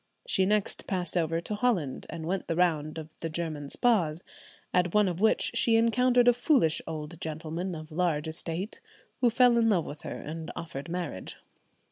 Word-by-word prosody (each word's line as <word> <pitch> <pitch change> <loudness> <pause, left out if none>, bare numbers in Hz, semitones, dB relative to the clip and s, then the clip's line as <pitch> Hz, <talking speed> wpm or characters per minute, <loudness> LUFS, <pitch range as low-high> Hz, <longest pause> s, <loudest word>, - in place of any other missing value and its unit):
She 190 -2 +2
next 210 0 0
passed 180 -3 -2
over 165 -1 +1
to 210 - -5
Holland, 205 - 0
and 160 0 -6
went 190 +3 -2
the 165 - -1
round 160 -3 +1
of 155 0 -8
the 165 - -3
German 155 -3 -4
spas, 175 -9 +2 0.5
at 180 +1 +2
one 210 -1 +5
of 180 0 -3
which 220 - +3
she 230 - +3
encountered 245 +2 +4
a 245 - +8
foolish 245 - +2
old 160 +1 -6
gentleman 160 +3 -4
of 155 0 -9
large 160 -2 0
estate, 165 +5 -4 0.4
who 245 - +4
fell 240 0 +5
in 225 -1 +3
love 180 -7 +2
with 145 +1 -8
her - - -6
and 160 +2 -6
offered 165 -2 -6
marriage. 170 - -4
170 Hz, 180 wpm, -29 LUFS, 160-210 Hz, 0.5 s, a